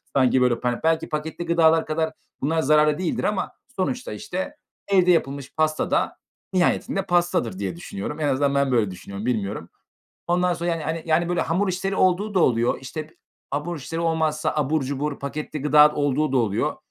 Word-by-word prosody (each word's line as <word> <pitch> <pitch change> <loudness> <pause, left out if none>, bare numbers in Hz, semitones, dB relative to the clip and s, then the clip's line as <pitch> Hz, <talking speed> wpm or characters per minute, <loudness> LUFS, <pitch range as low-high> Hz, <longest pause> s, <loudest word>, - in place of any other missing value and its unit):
Sanki, 130 -1 +4
böyle, 125 -2 +2
pa 125 -1 -1
belki 160 0 +1
paketli 155 +2 -4
gıdalar 165 -1 +4
kadar 160 0 -1 0.3
bunlar 160 +3 +1
zararlı 150 +1 +4
değildir 180 -3 -2
ama 210 -2 -1 0.2
sonuçta, 245 +7 -2
işte, 210 +7 -5 0.3
evde 185 -2 +4
yapılmış 140 -5 -1
pasta 155 0 0
da - - +1 0.4
nihayetinde 185 +2 +1
pastadır 175 - +1
diye 95 -4 -3
düşünüyorum. 100 - -6
En 150 - 0
azından 140 +1 +1
ben 140 -1 +2
böyle 110 -6 +2
düşünüyorum. 100 +3 -8
Bilmiyorum. 105 -7 -2 0.6
Ondan 180 +1 +2
sonra, 170 +1 -2
yani, 160 0 -3
hani, 170 +2 +2
böyle 175 - +1
hamur 190 +4 0
işleri 190 +2 -2
olduğu 195 +3 +2
da 185 - +3
oluyor. 120 -5 +2
İşte, 155 +4 -6 0.4
abur 150 +4 -2
işleri 165 +5 -5
olmazsa 160 -1 0
abur 150 0 +1
cubur 140 +2 -3
paketli 150 +1 -5
gıda 150 +1 +6
olduğu 145 0 +1
da 135 - +2
oluyor 105 -4 0
155 Hz, 170 wpm, -24 LUFS, 135-175 Hz, 0.6 s, gıda